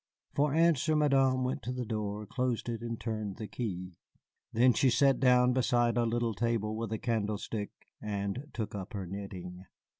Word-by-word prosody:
For 145 0 +2
answer 160 -2 +3
Madame 135 -3 +3
went 125 +1 -2
to 120 - -4
the 125 -1 -3
door, 105 -1 -3
closed 125 +1 -1
it, 115 -1 -3
and 115 -1 -4
turned 110 -4 -3
the 110 - -5
key. 90 -7 -5 0.5
Then 125 +2 +5
she 130 +4 +3
sat 135 +3 +4
down 125 -1 +5
beside 120 -2 +2
a 120 -1 +2
little 115 0 0
table 110 0 -1
with 115 -1 -4
a 110 - 0
candlestick 105 -2 -2 0.3
and 105 +6 -3
took 110 -2 -4
up 100 +3 -6
her 100 -3 -4
knitting. 90 -1 -7
115 Hz, 175 wpm, -31 LUFS, 105-125 Hz, 0.5 s, Then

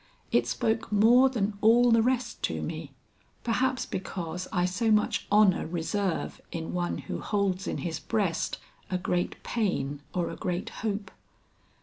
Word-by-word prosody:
It 120 0 +3
spoke 220 - -1
more 235 +6 +6
than 205 -5 -2
all 235 +2 +6
the 230 0 +6
rest 250 +1 0
to - - -3
me; - - -5 0.5
perhaps 255 +2 +1
because 180 -1 -4
I 180 -1 +2
so 205 +5 0
much 210 -1 +2
honor 205 -5 +5
reserve 175 +3 -2
in 165 -1 -4
one 175 -1 -1
who - - -5
holds 195 -2 -1
in - - -2
his 165 -3 -3
breast 200 -7 -1 0.3
a 185 - 0
great 180 -1 -2
pain 145 - -1
or 175 -2 -1
a - - -6
great 185 +5 -3
hope." 205 -3 -2
200 Hz, 150 wpm, -28 LUFS, 175-225 Hz, 0.5 s, more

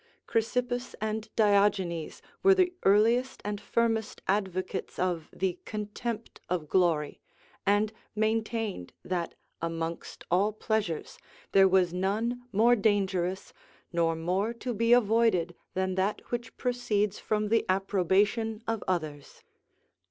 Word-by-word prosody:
Chrysippus 245 +2 -1
and 220 +1 -3
Diogenes 200 -6 +2 0.2
were 390 0 +6
the 365 -1 +3
earliest 230 +6 +3
and 205 -1 -3
firmest 225 -2 0
advocates 190 -2 -2
of 175 -4 -1
the 185 -2 -2
contempt 215 +2 -5
of 170 -4 -1
glory; 165 -4 +1 0.5
and 205 +2 +3 0.2
maintained 220 - -1
that, 175 -2 -2 0.3
amongst 165 0 -4
all 200 +4 +3
pleasures, 215 -6 -2 0.3
there 195 0 +6
was 185 -2 +3
none 215 +7 -1
more 225 +4 +5
dangerous 190 -4 0 0.4
nor 165 -1 +2
more 185 +8 -1
to 245 +1 -4
be 230 +2 +1
avoided 225 -7 +4 0.2
than 190 0 0
that 190 +3 -2
which 240 -1 -4
proceeds 215 -5 0
from 210 -1 -1
the 225 +1 +3
approbation 200 +4 +1
of 225 -1 -1
others. 155 -6 -3
205 Hz, 115 wpm, -29 LUFS, 185-225 Hz, 0.5 s, were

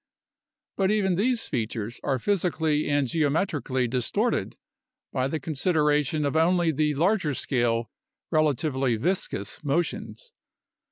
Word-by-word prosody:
But 190 -1 +2
even 205 -3 +2
these 230 +6 +1
features 115 -1 -3
are 135 - +1
physically 160 - 0
and 145 -2 +2
geometrically 145 -4 0
distorted 125 0 -1 0.6
by 130 0 +1
the 155 +3 -2
con 155 +3 -5
sideration 150 -1 +2
of 140 - -1
only 170 +1 +3
the 150 0 0
larger 170 -2 +1
scale, 120 -4 0 0.4
relatively 140 -5 +1
viscous 150 - -2
motions. 170 - -2
150 Hz, 115 wpm, -26 LUFS, 130-175 Hz, 0.6 s, only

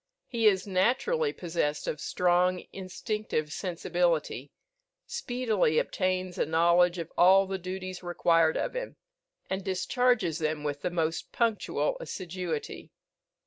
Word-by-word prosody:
He 230 -3 +1
is 190 -3 +3
naturally 260 - +1
possessed 165 - -2
of 150 - -3
strong 180 0 +2
instinctive 185 -4 -3
sensibility, 170 - -1 0.5
speedily 245 - 0
obtains 185 0 -1
a - - +2
knowledge 170 +2 +4
of 165 -1 -5
all 190 +2 +7
the 190 0 -4
duties 185 0 -6
required 165 -2 +2
of - - -2
him, - - -4 0.5
and 190 0 -3
discharges 195 -2 +1
them 155 -1 -1
with 145 -1 -3
the - - -1
most 165 -1 -2
punctual 235 - 0
assiduity. 180 - -5
180 Hz, 120 wpm, -29 LUFS, 165-195 Hz, 0.5 s, all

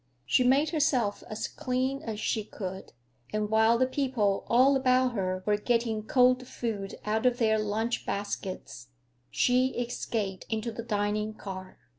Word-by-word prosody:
She 195 - +3
made 275 +5 +3
herself 265 -10 +1
as 215 - -3
clean 260 -1 -2
as 220 -7 -5
she 215 0 -1
could, 190 -2 -7 0.4
and 215 0 -1
while 220 +1 +5
the 255 - +3
people 255 -7 0
all 260 +4 +5
about 255 -1 +3
her 185 -3 -2
were 210 0 +2
getting 230 0 0
cold 250 +2 +3
food 210 -6 -4
out 220 +3 +1
of 245 -1 +2
their 220 -3 +2
lunch 215 +3 -1
baskets 195 -9 -5 0.4
she 255 +1 +2
escaped 225 -5 -3
into 225 +1 -2
the 225 - -6
dining 210 -1 -1
car. 185 -3 -8
225 Hz, 150 wpm, -29 LUFS, 205-255 Hz, 0.4 s, while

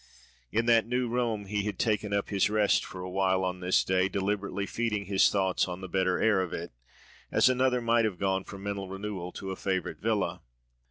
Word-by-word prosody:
In 115 +1 +1
that 115 -1 +4
New 125 +1 0
Rome 115 -3 -1
he 105 +1 -1
had 105 -3 -3
taken 105 -2 0
up 100 0 0
his 100 0 +2
rest 105 -1 +3
for 90 - -8
awhile 95 0 +1
on 90 0 -2
this 90 0 +2
day, 95 0 +1
deliberately 100 0 -2
feeding 105 -2 -2
his 95 -1 +4
thoughts 95 -2 +1
on 90 +1 -6
the 95 - -6
better 95 0 +1
air 105 -4 +3
of 90 - -4
it, - - -5 0.6
as - - +5
another 130 -1 +2
might 115 -1 +3
have 100 -5 -2
gone 95 0 0
for 100 - -9
mental 100 -1 -4
renewal 95 -2 -5
to 95 -1 -6
a - - -3
favourite 95 -1 -2
villa. 110 -2 -1
100 Hz, 205 wpm, -29 LUFS, 95-110 Hz, 0.6 s, as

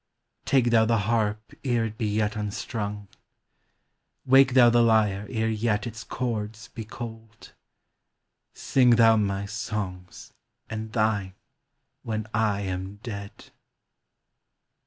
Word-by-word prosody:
Take 125 -3 +3
thou 115 -1 +5
the 115 0 +2
harp 110 -1 -1
ere 120 -4 +1
it 110 -1 -5
be 110 -1 -2
yet 105 0 0
unstrung 105 0 -4 0.6
— - - -50
Wake 135 0 +5
thou 120 -2 +7
the 120 0 +4
lyre 105 -3 +2
ere 110 -2 -1
yet 110 -2 0
its 115 -1 -7
chords 110 -3 -4
be 115 - -7
cold 110 0 -10 0.5
— - - -55 0.2
Sing 125 -3 +6
thou 115 -1 +6
my 100 -2 0
songs, 105 -5 -6 0.3
and 110 0 -6
thine, 105 -4 0 0.7
when 110 -3 -3
I 105 -2 +1
am 95 0 -4
dead 100 -4 -8
110 Hz, 125 wpm, -26 LUFS, 105-115 Hz, 0.7 s, thou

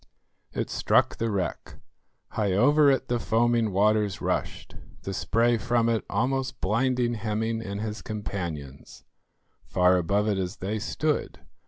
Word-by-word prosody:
It - - -3
struck - - +2
the 115 - -1
wreck. 95 -4 -3 0.5
High 105 -3 -1
over 145 +8 +5
it 135 -1 +1
the 120 -1 0
foaming 115 -1 +2
waters 105 +1 +2
rushed, - - -3 0.3
the 95 - -4
spray 115 +4 +1
from 120 +1 +1
it 115 -2 0
almost 130 +5 -1
blinding 120 +4 +1
Hemming 110 0 -2
and 100 -1 -5
his 110 0 -4
companions, 85 -10 -6 0.6
far 90 0 +3
above 100 +4 +1
it 100 -2 +1
as 95 +1 -3
they 105 +4 -3
stood. 150 +7 -2
110 Hz, 140 wpm, -26 LUFS, 100-120 Hz, 0.6 s, over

